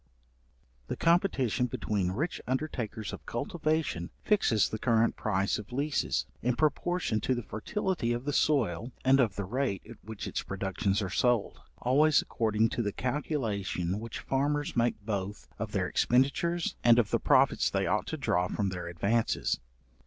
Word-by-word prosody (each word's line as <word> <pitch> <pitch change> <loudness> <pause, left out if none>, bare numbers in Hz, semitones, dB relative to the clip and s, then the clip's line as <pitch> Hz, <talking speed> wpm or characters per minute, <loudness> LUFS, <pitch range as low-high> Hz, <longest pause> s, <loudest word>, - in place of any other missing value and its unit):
The - - -3
competition 155 - +2
between 100 -5 -1
rich 145 - -2
undertakers 125 -6 -3
of - - -8
cultivation 155 - -1
fixes 120 - +3
the 110 - -4
current 115 -1 +2
price 100 -2 0
of 105 - -10
leases, 145 +4 0 0.2
in 125 +1 +1
proportion 155 -5 0
to 130 - +1
the 120 - -4
fertility 140 - -2
of 120 +2 -2
the 145 - -1
soil, 120 - +1
and 135 +1 +5
of 110 -7 +2
the 100 - -2
rate 125 -2 -1
at 115 -1 -13
which 110 -1 -7
its - - -2
productions 95 +1 -1
are 95 - -4
sold, 120 +1 +1 0.2
always 145 +5 +4
according 110 0 +1
to 120 - -2
the 105 -3 -1
calculation 105 - -2
which 115 0 -6
farmers 145 +2 0
make 120 -2 +1
both 100 -2 -3
of - - -3
their - - 0
expenditures, 140 +7 +1
and 120 -1 +7
of 115 -4 +2
the - - +2
profits - - +4
they - - 0
ought - - 0
to - - -3
draw 90 +1 +1
from 100 +1 -1
their 90 -2 -5
advances. 100 - 0
120 Hz, 160 wpm, -30 LUFS, 100-140 Hz, 0.2 s, and